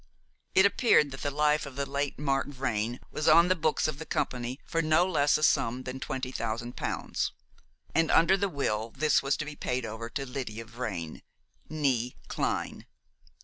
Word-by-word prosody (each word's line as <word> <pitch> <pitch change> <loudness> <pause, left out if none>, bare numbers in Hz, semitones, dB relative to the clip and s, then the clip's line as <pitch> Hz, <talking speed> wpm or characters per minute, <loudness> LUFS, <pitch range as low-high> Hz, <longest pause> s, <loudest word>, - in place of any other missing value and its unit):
It 190 - +7
appeared 200 - +4
that 135 - -8
the 145 - 0
life 150 +1 +1
of 135 - -10
the 140 0 -1
late 140 0 -2
Mark 135 -1 0
Vrain 120 -4 -2
was 155 - -2
on 170 +3 +7
the 185 - +4
books 155 -3 +1
of 150 -2 -4
the 160 - -6
company 125 +2 -2
for 165 - 0
no 155 +2 +4
less 145 -6 +3
a 155 - -4
sum 130 -3 +2
than 130 +1 -5
twenty 130 -1 -4
thousand 120 0 -3
pounds; - - -2 0.6
and 165 -1 +2
under 170 +3 +5
the 200 0 0
will 115 -8 -1
this 155 -1 +3
was 135 +1 0
to 155 - -3
be 150 0 -7
paid 125 -3 -2
over 115 +1 -6
to 135 +3 -4
Lydia 125 -4 -5
Vrain, 105 -9 -5 0.5
née 135 -6 0
Clyne. - - -2
140 Hz, 185 wpm, -29 LUFS, 120-155 Hz, 0.6 s, It